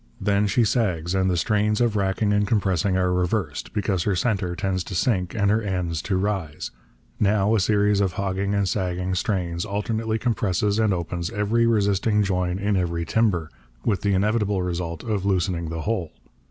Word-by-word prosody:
Then 100 0 +2
she 115 +5 +2
sags, 90 -7 0
and 95 -1 +2
the 90 - +1
strains 105 +2 +1
of 120 -3 +2
racking 100 +1 +1
and 105 0 +2
compressing 95 -4 +1
are 90 -1 +1
reversed, 90 -3 -1
because 100 -4 -1
her 100 +2 0
centre 95 -4 0
tends 95 -1 -1
to 95 - -6
sink 90 -1 0
and 100 -2 +2
her 110 +1 +2
ends 90 -6 -2
to 95 - -1
rise. 95 -6 -2 0.5
Now, 105 0 +2
a 110 - +3
series 105 +1 +2
of 95 -2 0
hogging 100 +1 -1
and 100 -1 +1
sagging 90 -1 -1
strains 90 -2 -1
alternately 110 +2 -2
compresses 105 -3 0
and 110 -2 +3
opens 85 -1 -2
every 115 +2 +1
resisting 105 -1 +2
join 90 -2 0
in 100 0 0
every 85 -2 -1
timber, 95 -8 +1 0.3
with 100 -4 +1
the 100 -2 +1
inevitable 105 -1 +1
result 85 -2 -3
of 105 -4 -2
loosening 90 -4 0
the 80 0 -4
whole. 95 -5 -2
100 Hz, 180 wpm, -24 LUFS, 90-105 Hz, 0.5 s, a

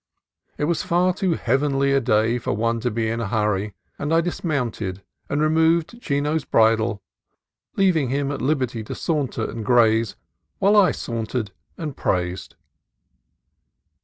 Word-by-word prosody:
It - - -2
was 160 +1 +1
far 180 +2 +2
too 185 -3 0
heavenly 140 +2 +1
a 135 0 +3
day 115 0 +2
for - - -2
one 115 +2 0
to 125 - -1
be 115 0 -1
in 115 +1 -2
a 115 - -2
hurry, 105 -2 -1 0.2
and 145 +2 -2
I 165 - +4
dismounted 125 - -2 0.3
and 145 - 0
removed 160 +7 +2
Chino's 145 0 0
bridle, 110 -2 +2 0.7
leaving 170 -9 +2
him 140 +1 -1
at 140 - -4
liberty 130 -5 -1
to - - -6
saunter 140 -8 -1
and 115 -1 -6
graze 115 -1 +3 0.4
while 200 +2 +3
I 200 -3 +6
sauntered 115 -2 -4 0.3
and 150 -4 -5
praised. 90 0 -2
130 Hz, 145 wpm, -22 LUFS, 110-155 Hz, 0.7 s, I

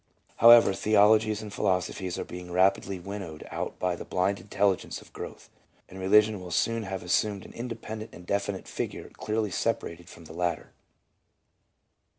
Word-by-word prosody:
However, 115 -3 +8
theologies 110 +1 +3
and 105 -2 -8
philosophies 90 0 -1
are - - -3
being 90 0 -8
rapidly 95 +1 +2
winnowed 95 -4 -7
out - - -4
by 90 -1 0
the - - -7
blind 95 +2 0
intelligence 100 -1 0
of - - -18
growth, - - -8 0.4
and 95 - -11
religion 105 +2 +4
will 90 - -8
soon 115 +7 +1
have 95 -3 -5
assumed 100 +2 0
an - - -12
independent 115 -2 -6
and 90 - -12
definite 100 0 -2
figure - - -5
clearly 110 -1 -2
separated 85 -5 -2
from 85 - -13
the 80 - -11
latter. 85 0 -2
100 Hz, 155 wpm, -28 LUFS, 90-110 Hz, 0.4 s, However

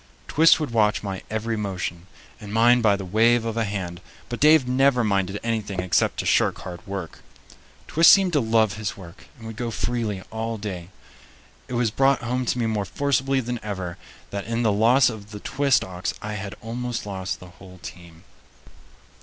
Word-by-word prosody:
Twist 165 +2 +5
would 150 -6 -3
watch 105 -3 +2
my 95 -2 -4
every 110 +1 -2
motion, 90 -4 -4 0.3
and 105 -3 -9
mind 120 +2 +4
by 105 -3 +4
the 100 -1 -6
wave 115 +5 +3
of 115 - -2
the 115 0 0
hand, 95 -4 -5 0.3
but 120 - -4
Dave 150 -3 +5
never 130 -1 +3
minded 100 -1 0
anything 110 -4 -2
except 90 -1 +1
to - - -2
shirk - - +2
hard 90 -1 -7
work. 95 -4 -6 0.7
Twist 165 +2 +6
seemed 190 -3 +6
to 150 - +4
love 110 -3 +2
his 110 -3 -4
work 90 -1 -13
and 115 - -12
would 110 -1 -8
go 120 0 -2
freely 115 -4 -2
all 115 +1 -3
day. 95 -4 -6 0.8
It - - -7
was 120 -2 +1
brought 135 +2 +2
home 125 +1 -2
to - - 0
me 120 - 0
more 110 -2 -1
forcibly 135 +3 0
than 120 0 -4
ever 95 -5 -5 0.3
that 100 0 -4
in 115 +1 -1
the 110 - +3
loss 120 +6 +4
of 110 -3 -5
the 105 -1 -8
Twist 135 -1 +1
ox 90 -1 -4
I 105 - -5
had 100 -1 -6
almost 120 +1 -4
lost 95 -2 -4
the 90 - -12
whole 95 -1 -13
team. 85 -1 -11
110 Hz, 190 wpm, -24 LUFS, 100-120 Hz, 0.8 s, Twist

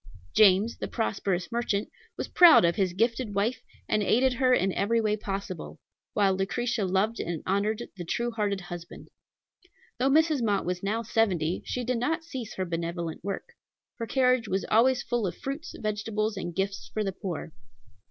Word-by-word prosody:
James, 210 +2 +5
the - - -3
prosperous 195 -4 -2
merchant, 230 -3 -1 0.3
was - - -3
proud 345 - +8
of 170 - +2
his 190 -3 0
gifted 230 +1 0
wife, 225 +4 0 0.3
and 215 - +1
aided 250 +5 +3
her 255 +1 +2
in 195 -6 +3
every 230 +3 +1
way 215 -1 +1
possible; 195 -4 -5 0.4
while 200 -2 +3
Lucretia 210 +3 -1
loved 195 +5 0
and 170 -2 -3
honored 210 +4 0
the 175 - -5
true 235 +8 -1
hearted 205 -4 -1
husband. 175 -1 -9 0.9
Though 260 +2 +3
Mrs. 310 -1 +3
Mott 205 -4 +1
was 180 0 -2
now 215 +4 -1
seventy, 185 -7 +1
she 250 - -2
did 250 0 -1
not 320 +7 -1
cease 260 -9 -7
her 185 - -2
benevolent 170 -1 -4
work. 200 +1 -4 0.5
Her 230 - -3
carriage 255 -3 +2
was 190 0 -1
always 245 +3 +4
full 235 -4 -1
of 175 - -5
fruits, 295 +4 -5
vegetables, 215 0 -2
and 175 -3 -5
gifts 195 -10 -2
for 215 - -1
the 195 - -1
poor. 175 -4 -5
210 Hz, 170 wpm, -28 LUFS, 190-235 Hz, 0.9 s, proud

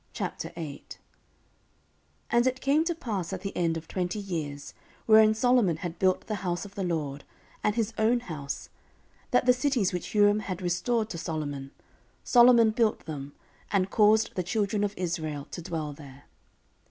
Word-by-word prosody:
14:008:001 155 -4 -6 1.3
And 240 +1 +4
it 255 0 0
came 285 +4 +2
to 345 0 -1
pass 205 - -4
at 190 - -4
the 195 0 -5
end 165 -2 +1
of 160 0 -9
twenty 180 +1 -2
years, 160 -8 -5 0.3
wherein 220 0 +6
Solomon 225 -7 +3
had 170 0 -6
built 185 -1 +2
the 215 -2 -3
house 175 0 -2
of 200 - -11
the 200 -1 -3
LORD, 150 -5 -2 0.4
and 210 - +1
his 225 -1 -1
own 235 +3 +3
house, 150 -10 -6 0.6
14:008:002 - - -38
That 250 - +2
the 250 - +6
cities 250 -7 +1
which 180 - -4
Huram 205 0 +4
had 185 -4 -5
restored 215 +6 0
to 170 - -5
Solomon, 145 -5 -4 0.5
Solomon 240 -2 +6
built 225 -1 0
them, 145 -3 -6 0.4
and 195 -1 +1
caused 215 0 +4
the 185 - -1
children 205 +3 -1
of 205 0 -1
Israel 155 -5 -3
to - - -6
dwell 160 -3 -4
there. 140 -1 -13
190 Hz, 165 wpm, -28 LUFS, 165-220 Hz, 1.3 s, wherein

